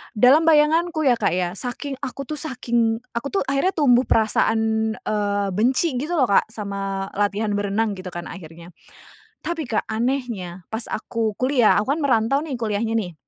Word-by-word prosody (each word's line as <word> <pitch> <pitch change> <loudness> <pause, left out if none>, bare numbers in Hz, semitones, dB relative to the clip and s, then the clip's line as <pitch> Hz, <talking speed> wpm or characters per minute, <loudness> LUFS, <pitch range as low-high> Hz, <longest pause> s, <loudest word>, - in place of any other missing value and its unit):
dalam 270 +9 +5
bayanganku 315 +1 +3
ya 245 -4 +3
Kak - - +1
ya, 180 -1 -1
saking 255 +6 -5
aku 275 0 -5
tuh 300 +2 -6
saking 235 -5 -1
aku 235 +4 -3
tuh 390 - -1
akhirnya 275 +8 0
tumbuh 260 -5 +4
perasaan, 220 0 +1
eee, 205 -1 -1
benci 250 - +1
gitu 330 +5 -2
loh 260 -6 +3
Kak - - +4
sama 195 -2 -4
latihan 205 +1 0
berenang 205 +2 0
gitu 185 -2 -7
kan 175 0 -6
akhirnya, 170 -1 -11 0.7
tapi 330 -6 -3
Kak 225 - 0
anehnya 220 -7 -3
pas 220 +1 -1
aku 220 -2 -2
kuliah, 255 -3 +3
aku 215 +6 -1
kan 320 - -5
merantau 250 0 +2
nih 290 -3 -4
kuliahnya 225 0 -1
nih. 190 -6 -2
225 Hz, 165 wpm, -22 LUFS, 205-275 Hz, 0.7 s, dalam